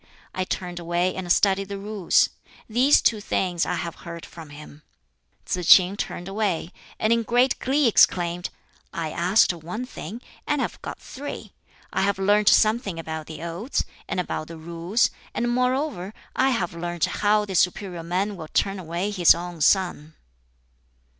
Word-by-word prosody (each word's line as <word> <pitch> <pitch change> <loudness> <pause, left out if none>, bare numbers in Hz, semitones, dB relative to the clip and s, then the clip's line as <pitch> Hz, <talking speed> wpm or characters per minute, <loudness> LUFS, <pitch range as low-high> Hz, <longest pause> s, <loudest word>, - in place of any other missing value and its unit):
I 185 - -2
turned 180 -1 -4
away 175 +2 0
and 180 -2 -3
studied 195 +1 +2
the 200 - -4
Rules. 200 -2 +2 0.4
These 250 +6 +4
two 215 -2 +2
things 180 -4 -1
I - - 0
have 170 0 -5
heard 170 -1 -9
from 165 -3 -11
him." 145 0 -12 0.6
Tsz - - -1
k'in 185 +1 +7
turned 180 -3 -5
away, 195 -4 -1 0.3
and 215 +1 +2
in 230 - +2
great 245 +3 +2
glee 275 +1 +2
exclaimed, 175 -5 +3 0.4
"I 165 -4 -4
asked 180 +4 +3
one 175 +9 -6
thing, 225 -3 -8 0.3
and 295 -1 +1
have - - -3
got - - -6
three. 285 +2 -8 0.4
I - - +1
have 200 0 +1
learnt 205 +2 +4
something 215 -4 +3
about 160 -1 -5
the 160 0 -8
Odes, 175 +10 -2 0.2
and - - -2
about 155 -3 -3
the 165 - -9
Rules, 170 +7 0 0.2
and 240 0 0
moreover 250 - -1 0.2
I 265 +1 +3
have 195 -10 -1
learnt 175 0 -1
how 210 0 +1
the 195 - -6
superior 180 0 0
man 185 +5 -2
will 160 -4 -9
turn 195 0 +1
away 175 +4 -3
his 180 -4 +6
own 175 -1 -7
son." 160 -3 +2
185 Hz, 165 wpm, -24 LUFS, 170-210 Hz, 0.6 s, k'in